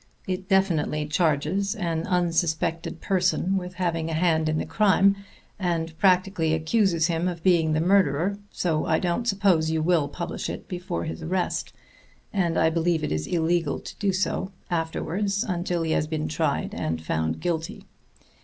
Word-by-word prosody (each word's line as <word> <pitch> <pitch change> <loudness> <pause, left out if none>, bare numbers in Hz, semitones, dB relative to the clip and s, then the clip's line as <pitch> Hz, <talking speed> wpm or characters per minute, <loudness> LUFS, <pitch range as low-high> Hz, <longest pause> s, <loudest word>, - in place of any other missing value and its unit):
It 185 0 -4
definitely 165 -6 +2
charges 160 +5 0
an 170 -5 -2
unsuspected 165 -2 0
person 185 0 +1
with 180 -1 -3
having 165 -3 -1
a 160 - -2
hand 160 -2 +2
in 155 - 0
the - - -1
crime, 200 -1 +4 0.4
and 165 -3 -1
practically 185 -4 +3
accuses 170 0 +2
him 170 0 0
of 170 -2 -4
being 165 -4 +3
the 155 - +1
murderer, 185 +1 +2
so 160 -4 -1
I 160 - +3
don't 180 +7 -1
suppose 190 -6 +3
you 160 -1 0
will 165 -4 +2
publish 170 +4 -5
it - - -6
before 180 -1 -4
his 160 +1 -5
arrest, 180 +3 -2 0.6
and 175 -5 +1
I 160 0 +3
believe 165 -1 +1
it - - -2
is 75 0 -2
illegal 165 -2 0
to - - -9
do 200 -2 +2
so 190 0 -1 0.2
afterwards 180 +4 -1
until 175 -2 -1
he 160 - -1
has 155 - +1
been 155 -1 -2
tried 155 - -1
and 80 +1 -2
found 80 0 -2
guilty. 165 -2 -3
170 Hz, 165 wpm, -25 LUFS, 160-185 Hz, 0.6 s, crime